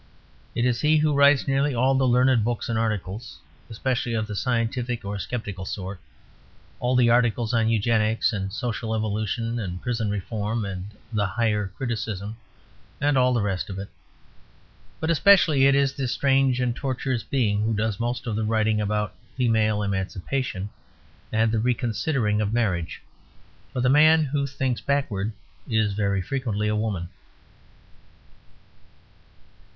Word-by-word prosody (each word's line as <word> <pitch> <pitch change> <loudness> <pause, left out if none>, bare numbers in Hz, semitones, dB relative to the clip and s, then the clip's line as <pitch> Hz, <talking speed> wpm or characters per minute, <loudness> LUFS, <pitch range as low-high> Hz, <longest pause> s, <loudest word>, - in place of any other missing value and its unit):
It 120 - +1
is 120 -2 +1
he 155 +1 +4
who 150 0 +2
writes 140 0 +5
nearly 135 0 +1
all 130 +3 +3
the 135 -1 +2
learned 125 -1 +4
books 120 +1 -2
and 115 -1 0
articles, 110 0 -3 0.3
especially 120 +1 -1
of 110 -1 0
the 105 -1 -6
scientific 120 0 -1
or 100 0 -4
skeptical 105 -5 -5
sort; 95 0 -5 0.8
all 125 +1 +1
the 120 -2 +5
articles 120 -1 +2
on 115 -1 +2
Eugenics 110 +1 +2
and 95 -2 -3
Social 110 +1 -3
Evolution 110 +2 -2
and 90 -4 -4
Prison 115 -2 -2
Reform 105 +2 -2
and 95 -1 -5 0.3
the 105 -2 +1
Higher 105 -1 0
Criticism 110 -4 -4 0.6
and 145 0 +2
all 125 -1 +4
the 120 -4 +1
rest 95 -2 -2
of 95 - -5
it. 100 +1 -6 1.1
But 160 +1 0
especially 165 -6 +5
it 140 - +4
is 140 -1 +2
this 135 -4 -2
strange 135 -2 +2
and 125 -2 0
tortuous 130 -2 -2
being 105 -7 0
who 110 +1 0
does 105 -1 -1
most 120 0 -2
of 115 -3 -2
the 110 - -1
writing 110 0 +1
about 105 0 -1 0.2
female 110 -4 +2
emancipation 100 +2 -3 0.6
and 110 0 +2
the 110 - +1
reconsidering 115 -1 0
of 105 -1 -1
marriage. 95 -8 -1 0.7
For 125 - -2
the 125 - +2
man 155 +4 +6
who 140 -1 -1
thinks 130 -2 -2
backwards 115 -7 -1 0.4
is 110 -3 +1
very 100 -2 0
frequently 110 -3 -2
a 105 - +1
woman. 105 -5 -2
115 Hz, 150 wpm, -25 LUFS, 105-125 Hz, 1.1 s, man